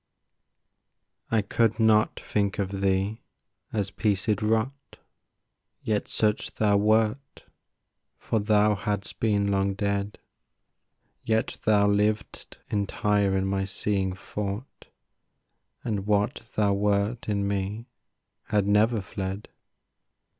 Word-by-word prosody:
I 110 Hz, -2 st, +2 dB
could 115 Hz, +2 st, +1 dB
not 110 Hz, -1 st, +3 dB
think 100 Hz, -2 st, -1 dB
of 100 Hz, -1 st, -2 dB
thee 95 Hz, +3 st, 0 dB, 0.5 s
as 100 Hz, -3 st, -2 dB
piecèd 100 Hz, +1 st, 0 dB
rot, 115 Hz, +6 st, -1 dB, 0.9 s
Yet 105 Hz, -2 st, -1 dB
such 105 Hz, -1 st, 0 dB
thou 105 Hz, -2 st, +3 dB
wert, 110 Hz, +6 st, +1 dB, 0.7 s
for 110 Hz, -, -1 dB
thou 105 Hz, 0 st, +3 dB
hadst 105 Hz, 0 st, -3 dB
been 100 Hz, -2 st, +1 dB
long 100 Hz, 0 st, +1 dB
dead; 100 Hz, 0 st, -2 dB, 1.0 s
Yet 110 Hz, 0 st, -1 dB
thou 105 Hz, -1 st, +4 dB
liv'dst 105 Hz, +1 st, -1 dB
entire 100 Hz, -1 st, +1 dB
in 95 Hz, -, 0 dB
my 95 Hz, 0 st, 0 dB
seeing 95 Hz, -1 st, -1 dB
thought 100 Hz, +5 st, -6 dB, 1.0 s
And 105 Hz, -4 st, -2 dB
what 105 Hz, +3 st, 0 dB
thou 105 Hz, -2 st, +3 dB
wert 105 Hz, +3 st, 0 dB
in 100 Hz, -1 st, 0 dB
me 100 Hz, +3 st, -2 dB, 0.6 s
had 105 Hz, -2 st, +1 dB
never 105 Hz, +2 st, +3 dB
fled. 95 Hz, +1 st, -5 dB
105 Hz, 105 wpm, -26 LUFS, 100-110 Hz, 1.0 s, thou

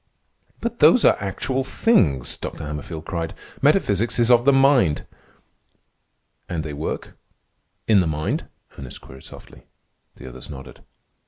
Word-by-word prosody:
"But 235 Hz, 0 st, -4 dB
those 250 Hz, -, +6 dB
are -, -, +6 dB
actual 130 Hz, +7 st, -2 dB
things!" 85 Hz, -, +2 dB
Dr. -, -, -7 dB
Hammerfield 75 Hz, +2 st, -6 dB
cried. 85 Hz, -2 st, -4 dB, 0.3 s
"Metaphysics 105 Hz, +3 st, +2 dB
is 120 Hz, 0 st, +3 dB
of 120 Hz, 0 st, +5 dB
the 140 Hz, -, +6 dB
mind." 135 Hz, -, +3 dB, 1.4 s
"And 85 Hz, -3 st, -3 dB
they 75 Hz, -2 st, -6 dB
work—in 90 Hz, +7 st, -4 dB
the 90 Hz, -, +1 dB
mind?" 75 Hz, 0 st, -2 dB, 0.3 s
Ernest 65 Hz, -3 st, -9 dB
queried 65 Hz, 0 st, -14 dB
softly. -, -, -13 dB, 0.5 s
The -, -, -11 dB
other 65 Hz, 0 st, -10 dB
nodded. 65 Hz, -2 st, -10 dB
90 Hz, 130 wpm, -22 LUFS, 75-125 Hz, 1.4 s, those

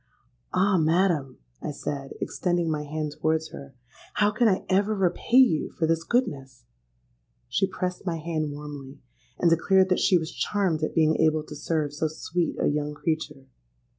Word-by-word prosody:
'—'Ah! 190 Hz, -1 st, +3 dB
madam,' 160 Hz, -4 st, +1 dB, 0.2 s
I -, -, -4 dB
said, 140 Hz, -1 st, -5 dB
extending 175 Hz, -2 st, -1 dB
my 150 Hz, -1 st, -1 dB
hand 150 Hz, 0 st, -3 dB
towards 160 Hz, 0 st, +1 dB
her, 140 Hz, -1 st, -10 dB, 0.4 s
'how 205 Hz, 0 st, +3 dB
can 225 Hz, +2 st, +2 dB
I 190 Hz, -3 st, +1 dB
ever 200 Hz, +3 st, +2 dB
repay 195 Hz, +5 st, +1 dB
you 245 Hz, -, +5 dB
for 165 Hz, -, -2 dB
this 165 Hz, 0 st, +1 dB
goodness?'—She -, -, -4 dB
pressed 185 Hz, -1 st, -4 dB
my 175 Hz, -4 st, -2 dB
hand 155 Hz, -2 st, -2 dB
warmly, 145 Hz, -2 st, -8 dB, 0.4 s
and 170 Hz, -, +3 dB
declared 190 Hz, +3 st, +4 dB
that 185 Hz, -, +2 dB
she 185 Hz, -, +4 dB
was 160 Hz, 0 st, -4 dB
charmed 190 Hz, -6 st, 0 dB
at 155 Hz, -, -2 dB
being 160 Hz, -1 st, +3 dB
able 155 Hz, -1 st, +2 dB
to 150 Hz, -, -10 dB
serve 150 Hz, -1 st, -2 dB
so 155 Hz, +2 st, -1 dB
sweet 165 Hz, +2 st, -2 dB
a -, -, +1 dB
young 150 Hz, 0 st, -1 dB
creature. 150 Hz, -3 st, -3 dB
160 Hz, 165 wpm, -26 LUFS, 145-185 Hz, 0.4 s, you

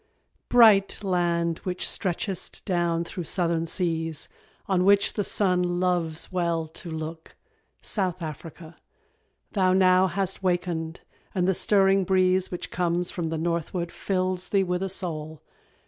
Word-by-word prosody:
_ -, -, -51 dB
Bright 215 Hz, -4 st, +5 dB
land 170 Hz, -3 st, 0 dB
which 180 Hz, -1 st, -3 dB
stretchest 185 Hz, 0 st, -3 dB
down 170 Hz, -3 st, 0 dB
through 170 Hz, 0 st, -6 dB
Southern 165 Hz, -1 st, 0 dB
seas 165 Hz, -3 st, -1 dB, 0.4 s
On 185 Hz, -2 st, +1 dB
which 200 Hz, +1 st, +4 dB
the 205 Hz, -, -1 dB
Sun 185 Hz, -3 st, +2 dB
loves 175 Hz, -2 st, -1 dB
well 170 Hz, -3 st, -1 dB
to 170 Hz, +2 st, -5 dB
look 160 Hz, 0 st, -7 dB, 0.5 s
South 185 Hz, -4 st, -1 dB
Africa 160 Hz, +1 st, -8 dB, 0.8 s
Thou 185 Hz, -3 st, +2 dB
now 185 Hz, 0 st, +5 dB
hast 190 Hz, +1 st, -2 dB
wakened 175 Hz, -3 st, -2 dB, 0.3 s
and 180 Hz, -1 st, +1 dB
the 190 Hz, -, +3 dB
stirring 195 Hz, 0 st, +3 dB
breeze 185 Hz, 0 st, +2 dB
Which 180 Hz, -, -6 dB
comes 175 Hz, 0 st, -1 dB
from 170 Hz, -3 st, -3 dB
the 160 Hz, -, -2 dB
northward 170 Hz, +1 st, -2 dB
fills 185 Hz, -1 st, -2 dB
thee 195 Hz, -1 st, +3 dB
with 180 Hz, 0 st, -2 dB
a 195 Hz, -, -2 dB
soul. 160 Hz, -5 st, -4 dB
180 Hz, 140 wpm, -26 LUFS, 170-190 Hz, 0.8 s, Bright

